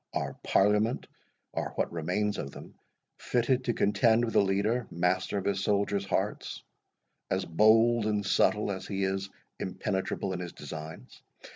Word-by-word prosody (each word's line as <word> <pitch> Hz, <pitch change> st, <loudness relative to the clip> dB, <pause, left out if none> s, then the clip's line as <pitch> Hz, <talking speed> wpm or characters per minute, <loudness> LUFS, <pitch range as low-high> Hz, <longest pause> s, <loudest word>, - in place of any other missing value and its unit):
Are -, -, -2 dB
Parliament, 105 Hz, +4 st, +2 dB, 0.5 s
or -, -, -3 dB
what -, -, -1 dB
remains 90 Hz, +6 st, -1 dB
of 70 Hz, -, -4 dB
them, -, -, -11 dB, 0.5 s
fitted 125 Hz, +1 st, +1 dB
to 120 Hz, -, +1 dB
contend 115 Hz, +3 st, +3 dB
with 115 Hz, -, -5 dB
a -, -, +7 dB
leader, 100 Hz, +5 st, +1 dB
master 90 Hz, +3 st, 0 dB
of 95 Hz, -, -3 dB
his 100 Hz, -1 st, 0 dB
soldiers' 100 Hz, -1 st, +1 dB
hearts, 95 Hz, +2 st, -2 dB, 0.7 s
as -, -, 0 dB
bold 110 Hz, +5 st, +4 dB
and 105 Hz, -1 st, 0 dB
subtle 105 Hz, +1 st, +2 dB
as 95 Hz, -, -5 dB
he 100 Hz, -1 st, -2 dB
is 95 Hz, 0 st, -1 dB, 0.3 s
impenetrable 95 Hz, 0 st, -2 dB
in 90 Hz, -, -4 dB
his 90 Hz, -1 st, -6 dB
designs! 80 Hz, +2 st, -9 dB
100 Hz, 150 wpm, -29 LUFS, 95-110 Hz, 0.7 s, a